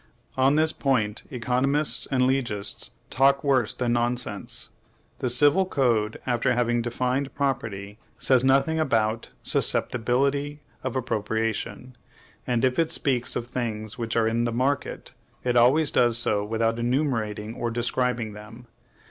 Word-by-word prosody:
On 135 Hz, +2 st, +3 dB
this 155 Hz, +1 st, +2 dB
point, 115 Hz, -7 st, -1 dB
economists 130 Hz, +4 st, +1 dB
and 130 Hz, -2 st, +1 dB
legists 125 Hz, -6 st, 0 dB, 0.2 s
talk 135 Hz, +1 st, +3 dB
worse 130 Hz, -6 st, +1 dB
than 120 Hz, -2 st, -1 dB
nonsense. 120 Hz, +1 st, -2 dB, 0.5 s
The 125 Hz, -, -1 dB
Civil 145 Hz, +9 st, +5 dB
Code, 115 Hz, -9 st, 0 dB
after 120 Hz, -1 st, 0 dB
having 120 Hz, -1 st, +1 dB
defined 125 Hz, +3 st, -2 dB
property, 110 Hz, -7 st, -3 dB, 0.2 s
says 130 Hz, -2 st, +4 dB
nothing 135 Hz, +4 st, +2 dB
about 115 Hz, -6 st, 0 dB
susceptibility 140 Hz, +5 st, 0 dB, 0.2 s
of 130 Hz, -1 st, -4 dB
appropriation; 110 Hz, +1 st, -3 dB, 0.5 s
and 120 Hz, 0 st, +1 dB
if 130 Hz, +3 st, 0 dB
it 165 Hz, -, +1 dB
speaks 125 Hz, -4 st, +2 dB
of 115 Hz, -, -3 dB
things 115 Hz, -3 st, -5 dB
which 115 Hz, -1 st, -3 dB
are 115 Hz, -1 st, +2 dB
in 115 Hz, +1 st, 0 dB
THE 115 Hz, -, -1 dB
MARKET, 130 Hz, +4 st, -2 dB, 0.3 s
it 125 Hz, -1 st, 0 dB
always 135 Hz, +6 st, +4 dB
does 120 Hz, -2 st, +3 dB
so 105 Hz, -3 st, +1 dB
without 115 Hz, +2 st, -1 dB
enumerating 115 Hz, -4 st, -1 dB
or 120 Hz, 0 st, -3 dB
describing 120 Hz, -1 st, -1 dB
them. 110 Hz, +3 st, -12 dB
120 Hz, 135 wpm, -25 LUFS, 115-135 Hz, 0.5 s, Civil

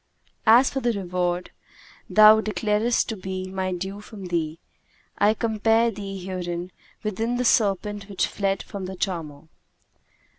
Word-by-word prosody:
As 240 Hz, +4 st, +7 dB
for 270 Hz, -, -2 dB
the 240 Hz, -2 st, 0 dB
reward 180 Hz, -2 st, -2 dB, 0.6 s
thou 215 Hz, 0 st, +7 dB
declarest 215 Hz, +2 st, +1 dB
to 225 Hz, -, -2 dB
be 185 Hz, -1 st, -5 dB
my 190 Hz, -1 st, -2 dB
due 190 Hz, +3 st, -5 dB
from 210 Hz, -2 st, -10 dB
thee, 160 Hz, -2 st, -1 dB, 0.6 s
I 210 Hz, +2 st, +4 dB
compare 225 Hz, +1 st, +2 dB
thee 200 Hz, -2 st, -6 dB
herein 180 Hz, -1 st, -5 dB, 0.3 s
with 210 Hz, -3 st, -3 dB
the 245 Hz, +2 st, 0 dB
serpent 205 Hz, -2 st, +1 dB
which 195 Hz, -, 0 dB
fled 195 Hz, -1 st, -1 dB
from 195 Hz, -2 st, -6 dB
the 190 Hz, -, -6 dB
charmer. 165 Hz, -7 st, -4 dB
195 Hz, 140 wpm, -24 LUFS, 185-220 Hz, 0.6 s, As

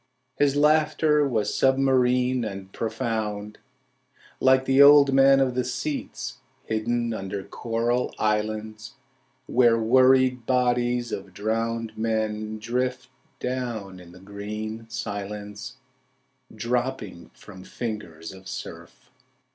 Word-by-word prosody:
His 145 Hz, -1 st, +3 dB
laughter 150 Hz, 0 st, +3 dB
was 110 Hz, -5 st, -1 dB
submarine 130 Hz, -2 st, +2 dB
and 95 Hz, -2 st, -7 dB
profound 110 Hz, -3 st, -3 dB, 0.8 s
Like 130 Hz, 0 st, +4 dB
the 135 Hz, +1 st, +4 dB
old 140 Hz, -1 st, +8 dB
man 135 Hz, 0 st, +6 dB
of 130 Hz, -2 st, +1 dB
the 125 Hz, 0 st, 0 dB
sea's 140 Hz, +4 st, -4 dB, 0.3 s
Hidden 115 Hz, +1 st, -1 dB
under 95 Hz, -1 st, -5 dB
coral 120 Hz, +2 st, -1 dB
islands 110 Hz, +2 st, -2 dB, 0.5 s
Where 120 Hz, -3 st, +4 dB
worried 130 Hz, +1 st, +4 dB
bodies 125 Hz, -1 st, +1 dB
of 95 Hz, -2 st, -6 dB
drowned 115 Hz, +2 st, -2 dB
men 110 Hz, -1 st, -2 dB
drift 125 Hz, +3 st, -2 dB, 0.3 s
down 120 Hz, -7 st, -4 dB
in 90 Hz, -1 st, -14 dB
the 90 Hz, -, -14 dB
green 105 Hz, +3 st, -7 dB
silence, 105 Hz, +3 st, -6 dB, 0.7 s
Dropping 115 Hz, -5 st, -3 dB
from 95 Hz, -3 st, -13 dB
fingers 95 Hz, -9 st, -6 dB
of 95 Hz, 0 st, -13 dB
surf. -, -, -9 dB
115 Hz, 105 wpm, -25 LUFS, 105-130 Hz, 0.8 s, old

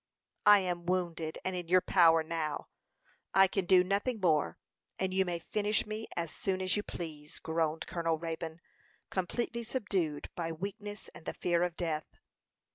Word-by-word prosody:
"I 205 Hz, -1 st, +9 dB
am 175 Hz, -2 st, -3 dB
wounded 170 Hz, -3 st, -1 dB
and 185 Hz, 0 st, -1 dB
in 175 Hz, -2 st, -4 dB
your 185 Hz, +2 st, +6 dB
power 165 Hz, -4 st, +5 dB
now; 155 Hz, -2 st, -3 dB, 0.7 s
I 195 Hz, 0 st, +8 dB
can 190 Hz, 0 st, -1 dB
do 185 Hz, 0 st, +6 dB
nothing 205 Hz, +5 st, 0 dB
more, 155 Hz, -, +2 dB, 0.4 s
and 190 Hz, 0 st, -1 dB
you 190 Hz, 0 st, +3 dB
may 175 Hz, -1 st, -1 dB
finish 210 Hz, +5 st, 0 dB
me 215 Hz, +1 st, -5 dB
as 165 Hz, -2 st, -1 dB
soon 190 Hz, -1 st, -1 dB
as 185 Hz, -1 st, +1 dB
you 205 Hz, -, +1 dB
please," 155 Hz, -6 st, -7 dB
groaned 160 Hz, -1 st, -1 dB
Colonel 165 Hz, -2 st, 0 dB
Raybone, 165 Hz, 0 st, -5 dB, 0.5 s
completely 235 Hz, +5 st, -2 dB
subdued 195 Hz, -, -2 dB
by 165 Hz, -1 st, -3 dB
weakness 205 Hz, +4 st, -6 dB
and 165 Hz, -, -14 dB
the -, -, -3 dB
fear 175 Hz, -1 st, +1 dB
of 175 Hz, -1 st, 0 dB
death. 160 Hz, -3 st, -3 dB
175 Hz, 165 wpm, -32 LUFS, 165-195 Hz, 0.7 s, I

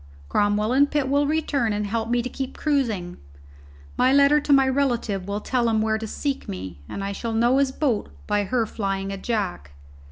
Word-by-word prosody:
Cromwell 205 Hz, +2 st, +1 dB
and 285 Hz, +2 st, +4 dB
Pitt 290 Hz, -3 st, 0 dB
will 285 Hz, +1 st, +2 dB
return 285 Hz, -7 st, 0 dB
and 210 Hz, 0 st, -1 dB
help 225 Hz, +2 st, -2 dB
me 240 Hz, 0 st, +1 dB
to -, -, -3 dB
keep 265 Hz, +1 st, -5 dB
cruising. 230 Hz, -, -1 dB, 0.8 s
My 255 Hz, -, +4 dB
letter 280 Hz, +2 st, +5 dB
to 290 Hz, -, -2 dB
my 270 Hz, -1 st, +6 dB
relative 240 Hz, -8 st, 0 dB
will 200 Hz, +1 st, -3 dB
tell 240 Hz, -1 st, 0 dB
him 220 Hz, -1 st, +2 dB
where 220 Hz, 0 st, +1 dB
to 220 Hz, -, -5 dB
seek 275 Hz, +5 st, -3 dB
me, 90 Hz, -4 st, -6 dB
and 200 Hz, -, -5 dB
I 200 Hz, -, -2 dB
shall 225 Hz, +3 st, -4 dB
know 240 Hz, +4 st, +3 dB
his 275 Hz, -1 st, +2 dB
boat 265 Hz, -6 st, -1 dB, 0.2 s
by 205 Hz, 0 st, 0 dB
her 240 Hz, +2 st, 0 dB
flying 195 Hz, -2 st, -3 dB
a 195 Hz, -, -4 dB
jack. 90 Hz, -, -3 dB
230 Hz, 200 wpm, -24 LUFS, 205-270 Hz, 0.8 s, my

